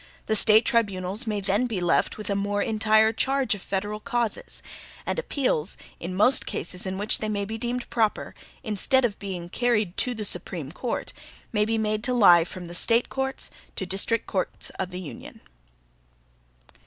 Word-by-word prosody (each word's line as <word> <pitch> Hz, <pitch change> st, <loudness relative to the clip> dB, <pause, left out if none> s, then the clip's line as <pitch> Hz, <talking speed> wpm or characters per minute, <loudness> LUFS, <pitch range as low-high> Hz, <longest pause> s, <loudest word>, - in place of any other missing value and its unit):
The 220 Hz, -, +1 dB
State 220 Hz, +1 st, +6 dB
tribunals 205 Hz, 0 st, 0 dB
may 210 Hz, -2 st, -1 dB
then 200 Hz, +5 st, +2 dB
be 220 Hz, -6 st, -2 dB
left 175 Hz, -1 st, +1 dB
with 215 Hz, -, -7 dB
a -, -, +1 dB
more 205 Hz, +1 st, 0 dB
entire 220 Hz, 0 st, +3 dB
charge 265 Hz, +1 st, +1 dB
of 205 Hz, -, -6 dB
federal 205 Hz, +2 st, -3 dB
causes; 240 Hz, -3 st, -2 dB, 0.4 s
and -, -, -1 dB
appeals, 250 Hz, -, -1 dB, 0.2 s
in 180 Hz, +2 st, -5 dB
most 230 Hz, +7 st, +4 dB
cases 180 Hz, +2 st, -4 dB
in 190 Hz, 0 st, -3 dB
which 205 Hz, +2 st, +1 dB
they 215 Hz, -, -2 dB
may 205 Hz, -1 st, -1 dB
be 220 Hz, +2 st, -5 dB
deemed 240 Hz, +1 st, -3 dB
proper, 225 Hz, -3 st, 0 dB, 0.3 s
instead 240 Hz, +4 st, +2 dB
of 205 Hz, -4 st, -2 dB
being 185 Hz, -4 st, -5 dB
carried 215 Hz, -2 st, 0 dB
to 250 Hz, -1 st, +2 dB
the 215 Hz, -1 st, -3 dB
Supreme 170 Hz, -6 st, -2 dB
Court, 235 Hz, +7 st, -3 dB, 0.4 s
may 210 Hz, -1 st, +3 dB
be 225 Hz, +1 st, 0 dB
made 215 Hz, -1 st, -1 dB
to 250 Hz, -, +2 dB
lie 175 Hz, -7 st, +7 dB
from 180 Hz, +1 st, -7 dB
the 170 Hz, -, -8 dB
State 230 Hz, +6 st, +2 dB
courts 265 Hz, 0 st, -2 dB, 0.2 s
to 190 Hz, -, -3 dB
district 200 Hz, +5 st, 0 dB
courts 185 Hz, -2 st, -3 dB
of 190 Hz, -1 st, -2 dB
the 180 Hz, 0 st, -6 dB
Union. 165 Hz, -, -9 dB
210 Hz, 180 wpm, -26 LUFS, 190-230 Hz, 0.4 s, lie